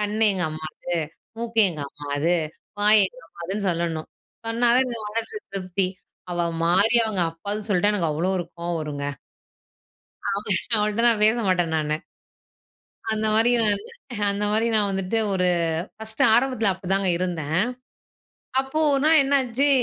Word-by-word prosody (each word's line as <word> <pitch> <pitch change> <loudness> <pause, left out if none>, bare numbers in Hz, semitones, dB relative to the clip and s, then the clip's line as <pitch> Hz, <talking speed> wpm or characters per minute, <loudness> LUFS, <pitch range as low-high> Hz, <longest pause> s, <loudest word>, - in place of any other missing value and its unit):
கண் 210 0 -2
எங்க 185 -2 -2
அம்மாது, 155 +2 -5 0.4
மூக்கு 230 -1 +1
எங்க 155 -3 -7
அம்மாது, 145 +4 -1 0.5
வாய் 210 0 +6
எங்க 170 - -13
அம்மாதுன்னு 190 +5 -4
சொல்லணும். 165 -2 -2 0.4
சொன்னா 235 +1 +2
தான் 260 +1 +4
எனக்கு 225 -3 -4
மனசு 230 - -3 0.2
திருப்தி. 185 0 -1 0.4
அவ 175 -1 0 0.2
மாறி 200 +7 +4
அவங்க 195 -5 0
அப்பான்னு 205 +6 -5
சொல்ட்டா 205 +2 +3
எனக்கு 170 -6 0
அவ்ளோ 170 +5 0
ஒரு 175 - -3
கோவம் 170 -1 -2
வரும்ங்க. 145 -2 -4 1.3
அவ 200 - -3 0.4
அவள்ட்ட 210 +1 0
நான் 220 -2 +2
பேச 220 +2 +4
மாட்டேன் 175 -3 +1
நானு. 155 0 0 1.2
அந்த 220 0 0
மாரி 225 +2 +4
நானு 210 - +1 0.5
அந்த 205 +1 -1
மாரி 225 +2 +2
நான் 205 -2 +2
வந்துட்டு 195 +3 -1
ஒரு 180 -1 +2 0.5
ஃபர்ஸ்ட்டு 220 0 -2
ஆரம்பத்தில 240 -4 +2
அப்டி 185 0 -11
தாங்க 195 -1 +2
இருந்தேன். 165 -4 -2 1.0
அப்போ 270 +3 -4
ஓர்னா 280 +3 +3
என்னாச்சு, 270 -1 +2
200 Hz, 140 wpm, -24 LUFS, 170-220 Hz, 1.3 s, வாய்